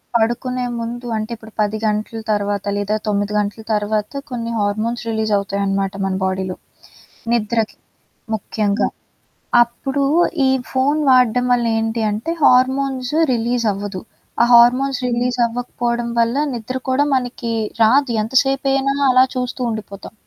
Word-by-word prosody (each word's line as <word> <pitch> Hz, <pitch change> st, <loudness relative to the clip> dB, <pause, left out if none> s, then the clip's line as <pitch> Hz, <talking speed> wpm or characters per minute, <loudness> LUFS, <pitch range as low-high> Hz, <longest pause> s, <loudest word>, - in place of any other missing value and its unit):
పడుకునే 245 Hz, +2 st, 0 dB
ముందు 240 Hz, +1 st, -5 dB
అంటే 215 Hz, +2 st, -4 dB
ఇప్పుడు 220 Hz, -1 st, -15 dB
10 210 Hz, +1 st, 0 dB
గంటల 215 Hz, +1 st, -1 dB
తర్వాత 205 Hz, -1 st, -1 dB
లేదా 205 Hz, +1 st, -1 dB
9 205 Hz, 0 st, 0 dB
గంటల 210 Hz, +2 st, -3 dB
తర్వాత 210 Hz, 0 st, -1 dB, 0.2 s
కొన్ని 235 Hz, -1 st, -3 dB
హార్మోన్స్ 215 Hz, +4 st, -1 dB
రిలీజవుతాయన్నమాట 200 Hz, -3 st, 0 dB
మన 190 Hz, -1 st, -1 dB
బాడీలో. 190 Hz, -1 st, -2 dB, 0.8 s
నిద్రకి. 225 Hz, -1 st, 0 dB, 0.6 s
ముఖ్యంగా. 210 Hz, 0 st, -1 dB, 0.8 s
అప్పుడు 270 Hz, +4 st, -3 dB, 0.4 s
ఈ -, -, +3 dB, 0.2 s
ఫోన్ 275 Hz, +4 st, +1 dB
వాడడం 250 Hz, -1 st, +4 dB
వల్ల 240 Hz, -1 st, +1 dB
ఏంటి 225 Hz, +1 st, -1 dB
అంటే 220 Hz, +11 st, -3 dB
హార్మోన్స్ 260 Hz, +1 st, +2 dB, 0.2 s
రిలీజ్ 235 Hz, 0 st, 0 dB
అవ్వదు. 200 Hz, -1 st, -5 dB, 0.4 s
ఆ -, -, +6 dB
హార్మోన్స్ 250 Hz, +3 st, +4 dB
రిలీజ్ 245 Hz, +1 st, 0 dB
అవ్వకపోవడం 240 Hz, 0 st, -2 dB
వల్ల 230 Hz, +1 st, +2 dB, 0.2 s
నిద్రకూడా 260 Hz, +4 st, -1 dB
మనకి 245 Hz, -2 st, -2 dB, 0.3 s
రాదు. 260 Hz, +4 st, +4 dB
ఎంతసేపైనా 270 Hz, +2 st, +1 dB, 0.2 s
అలా 255 Hz, 0 st, +6 dB
చూస్తూ 255 Hz, +1 st, -3 dB
ఉండిపోతాం. 210 Hz, -2 st, -7 dB
235 Hz, 120 wpm, -19 LUFS, 210-250 Hz, 0.8 s, ఆ